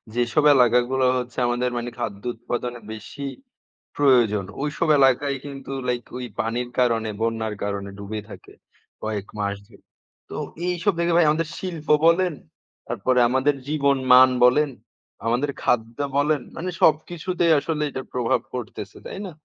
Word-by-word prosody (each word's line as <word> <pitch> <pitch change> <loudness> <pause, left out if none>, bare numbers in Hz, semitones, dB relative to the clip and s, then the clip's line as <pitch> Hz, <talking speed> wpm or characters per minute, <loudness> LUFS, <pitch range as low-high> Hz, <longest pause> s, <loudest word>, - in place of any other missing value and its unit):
যেসব 120 +5 +1
এলাকাগুলো 125 +1 +3
হচ্ছে 125 -1 -5
আমাদের 120 +1 0
মানে 120 0 -3
খাদ্য 100 -4 -4
উৎপাদনের 120 0 -4
বেশি 110 +6 -9 0.7
প্রয়োজন, 120 -8 +4 0.2
ওইসব 150 +2 -1
এলাকায় 135 +1 +3
কিন্তু 135 -1 -8 0.2
লাইক 125 -1 -1
ওই 125 - -5
পানির 120 +2 -2
কারণে 115 -3 +2
বন্যার 115 -1 -1
কারণে 100 -1 -3
ডুবে 105 +1 -5
থাকে - - -12 0.5
কয়েক 105 -2 -3
মাস 100 -1 -1
ধরে। - - -20 0.5
তো - - -6 0.3
এইসব 180 +3 +1
ভেবে 170 0 +1
ভাই 175 - +6
আমাদের 155 +1 0
শিল্প 170 -5 -6 0.2
বলেন, 175 0 +4 0.5
তারপরে 125 -1 +1
আমাদের 130 +3 +2
জীবন 140 -2 +2 0.2
মান 130 +1 +9
বলেন, 145 +4 +4 0.6
আমাদের 125 +5 +1
খাদ্য 115 0 0 0.2
বলেন, 145 0 +2 0.2
মানে 180 +3 -3
সবকিছুতেই 170 +2 +2
আসলে 150 +1 -2
এটার 130 0 -6
প্রভাব 120 -1 +1
পড়তেছে। 115 -5 -6
তাই - - -6
না? - - -6
125 Hz, 140 wpm, -23 LUFS, 115-150 Hz, 0.7 s, মান